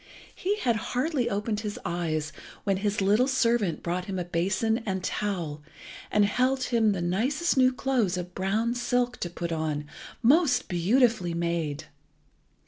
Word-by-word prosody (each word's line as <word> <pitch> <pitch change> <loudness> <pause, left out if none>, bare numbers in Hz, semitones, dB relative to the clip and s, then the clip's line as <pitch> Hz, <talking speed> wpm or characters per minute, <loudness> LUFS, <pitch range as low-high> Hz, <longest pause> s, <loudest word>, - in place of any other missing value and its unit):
He 400 +3 -1
had 240 - +1
hardly 255 +3 -1
opened 210 +1 -1
his 210 -1 -4
eyes 155 -3 -2 0.3
when 195 -2 +1
his 205 +1 -1
little 210 +6 +3
servant 235 - +1
brought 180 +1 -2
him 190 -1 -4
a 180 - -2
basin 195 +7 0
and 190 -3 -3
towel, 175 -10 -2 0.5
and 210 -1 +4
held 255 +5 +1
him 225 -4 +2
the 180 -3 -3
nicest 260 - +1
new 255 -1 +5
clothes 250 -8 0
of 180 0 -5
brown 215 +6 0
silk 245 0 0
to 175 - -3
put 170 0 -5
on, 155 -2 -2 0.4
most 260 -1 +4
beautifully 190 0 +2
made. 170 -4 -2
205 Hz, 150 wpm, -27 LUFS, 175-245 Hz, 0.5 s, new